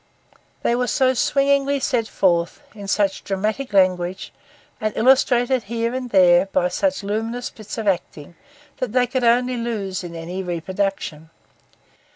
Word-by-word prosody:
They -, -, +2 dB
were 250 Hz, 0 st, 0 dB
so 260 Hz, +1 st, +2 dB
swingingly 280 Hz, +2 st, +2 dB
set 245 Hz, -5 st, 0 dB
forth, 175 Hz, +7 st, 0 dB
in 205 Hz, -2 st, -9 dB
such 195 Hz, -1 st, 0 dB
dramatic 215 Hz, +7 st, -2 dB
language, 185 Hz, 0 st, +1 dB, 0.5 s
and 215 Hz, 0 st, -1 dB
illustrated 250 Hz, 0 st, +3 dB
here 230 Hz, +2 st, -2 dB
and 255 Hz, -1 st, -4 dB
there 180 Hz, -2 st, +5 dB
by 185 Hz, -2 st, +1 dB
such 280 Hz, +5 st, -1 dB
luminous 225 Hz, +4 st, -3 dB
bits 215 Hz, 0 st, -9 dB
of 220 Hz, -2 st, -3 dB
acting, 170 Hz, -4 st, -2 dB, 0.4 s
that 245 Hz, -4 st, -3 dB
they 250 Hz, -1 st, +3 dB
could 250 Hz, +1 st, -2 dB
only 245 Hz, +1 st, +3 dB
lose 205 Hz, -6 st, -3 dB
in 170 Hz, -1 st, -8 dB
any 170 Hz, +3 st, -5 dB
reproduction. 180 Hz, -2 st, -3 dB
215 Hz, 145 wpm, -21 LUFS, 185-245 Hz, 0.5 s, there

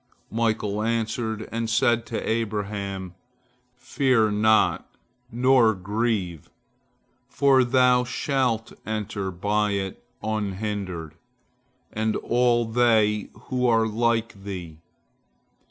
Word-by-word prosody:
Michael 110 Hz, -2 st, 0 dB
answered, 110 Hz, -1 st, -2 dB
and 115 Hz, 0 st, -2 dB
said 120 Hz, +1 st, +2 dB
to 115 Hz, -, -4 dB
Abraham, 100 Hz, -4 st, -3 dB, 0.6 s
"Fear 125 Hz, -3 st, +1 dB
not, 110 Hz, +1 st, +2 dB, 0.4 s
nor 120 Hz, -2 st, +4 dB
grieve, 95 Hz, -3 st, -2 dB, 0.8 s
for 135 Hz, -2 st, +4 dB
thou 125 Hz, 0 st, +4 dB
shalt 125 Hz, -3 st, -1 dB
enter 105 Hz, -2 st, -3 dB
by 105 Hz, +3 st, 0 dB
it 95 Hz, +1 st, -4 dB, 0.2 s
unhindered, 100 Hz, -6 st, -3 dB, 0.8 s
and 110 Hz, 0 st, 0 dB
all 120 Hz, -1 st, +2 dB
they 110 Hz, -3 st, +2 dB, 0.2 s
who 125 Hz, -1 st, +1 dB
are 115 Hz, -1 st, +3 dB
like 115 Hz, -2 st, -1 dB
thee." 90 Hz, -6 st, -7 dB
110 Hz, 90 wpm, -24 LUFS, 100-120 Hz, 0.8 s, nor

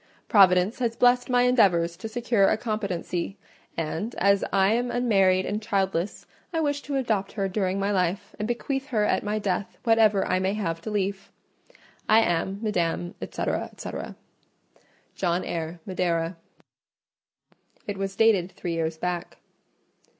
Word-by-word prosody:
Providence 190 Hz, +1 st, +5 dB
has 235 Hz, -2 st, 0 dB
blessed 245 Hz, +1 st, +3 dB
my 245 Hz, 0 st, +4 dB
endeavours 185 Hz, -9 st, +3 dB
to 205 Hz, -, -6 dB
secure 230 Hz, -3 st, +2 dB
a -, -, +2 dB
competency; 200 Hz, -4 st, -3 dB, 0.4 s
and 165 Hz, +8 st, -3 dB
as 200 Hz, 0 st, +3 dB
I 195 Hz, +2 st, +3 dB
am 245 Hz, +1 st, 0 dB
unmarried 195 Hz, -7 st, +3 dB
and 210 Hz, +2 st, -2 dB
childless, 195 Hz, -3 st, -1 dB, 0.3 s
I 330 Hz, -, -1 dB
wish 290 Hz, -2 st, 0 dB
to 285 Hz, -, -4 dB
adopt 220 Hz, -7 st, -1 dB
her 195 Hz, -3 st, -1 dB
during 190 Hz, 0 st, -1 dB
my 200 Hz, +1 st, 0 dB
life, 190 Hz, +1 st, -1 dB
and 210 Hz, -, -2 dB
bequeath 270 Hz, +3 st, -2 dB
her 225 Hz, -7 st, +1 dB
at -, -, +1 dB
my 210 Hz, +1 st, -1 dB
death 200 Hz, -1 st, -2 dB
whatever 220 Hz, -4 st, +4 dB
I 185 Hz, -, +1 dB
may 190 Hz, +2 st, 0 dB
have 165 Hz, -6 st, -2 dB
to 215 Hz, -, -5 dB
leave. 200 Hz, -1 st, -2 dB, 0.8 s
I 220 Hz, +1 st, +7 dB
am, 190 Hz, 0 st, 0 dB
Madam, 175 Hz, -4 st, -1 dB
&c., -, -, -4 dB, 0.3 s
&c., -, -, -6 dB, 1.2 s
"JOHN 175 Hz, -1 st, -1 dB
EYRE, 165 Hz, 0 st, -4 dB
Madeira." 175 Hz, -2 st, -1 dB, 1.5 s
It 205 Hz, -1 st, -4 dB
was 195 Hz, 0 st, -3 dB
dated 200 Hz, -5 st, +3 dB
three 175 Hz, -, -4 dB
years 160 Hz, -1 st, -2 dB
back. 175 Hz, +1 st, -4 dB
195 Hz, 150 wpm, -26 LUFS, 180-225 Hz, 1.5 s, I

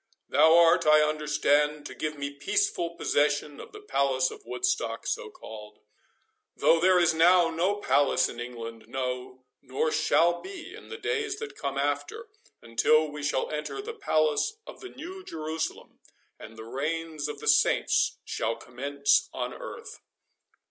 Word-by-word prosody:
—Thou 160 Hz, +1 st, +6 dB
art, 170 Hz, 0 st, +5 dB
I 155 Hz, 0 st, +7 dB
understand, 150 Hz, -1 st, +1 dB
to -, -, -7 dB
give 155 Hz, -1 st, -4 dB
me 140 Hz, 0 st, -4 dB
peaceful 400 Hz, -, -1 dB
possession 145 Hz, -1 st, 0 dB
of -, -, -10 dB
the 420 Hz, -, -10 dB
Palace 135 Hz, -, 0 dB
of -, -, -11 dB
Woodstock, 125 Hz, -2 st, -1 dB
so -, -, -3 dB
called—though 105 Hz, +9 st, -4 dB
there 185 Hz, +2 st, +5 dB
is 170 Hz, -2 st, +4 dB
now 170 Hz, +1 st, +5 dB
no 180 Hz, +5 st, +1 dB
palace 145 Hz, -8 st, +2 dB
in 120 Hz, -, -9 dB
England, 115 Hz, -2 st, -7 dB
no, 125 Hz, 0 st, -5 dB, 0.2 s
nor 135 Hz, +4 st, -1 dB
shall 170 Hz, +2 st, +2 dB
be 380 Hz, -3 st, -9 dB
in -, -, -12 dB
the 455 Hz, -, -6 dB
days 440 Hz, -1 st, -2 dB
that 450 Hz, -1 st, -7 dB
come 140 Hz, -1 st, -4 dB
after, 145 Hz, -, -2 dB, 0.3 s
until 155 Hz, +7 st, +2 dB
we 150 Hz, 0 st, -7 dB
shall 145 Hz, -2 st, -1 dB
enter 150 Hz, -, -4 dB
the 445 Hz, +3 st, -6 dB
palace 155 Hz, -, +1 dB
of -, -, -11 dB
the 380 Hz, -, -9 dB
New 370 Hz, +6 st, -9 dB
Jerusalem, 160 Hz, -, -5 dB, 0.4 s
and 110 Hz, 0 st, -11 dB
the 110 Hz, -, -8 dB
reign 155 Hz, +6 st, -3 dB
of 150 Hz, -, -6 dB
the -, -, -7 dB
Saints -, -, +3 dB
shall 115 Hz, +1 st, -2 dB
commence 140 Hz, +3 st, 0 dB
on 125 Hz, -1 st, -4 dB
earth." -, -, -9 dB
150 Hz, 155 wpm, -27 LUFS, 130-170 Hz, 0.4 s, I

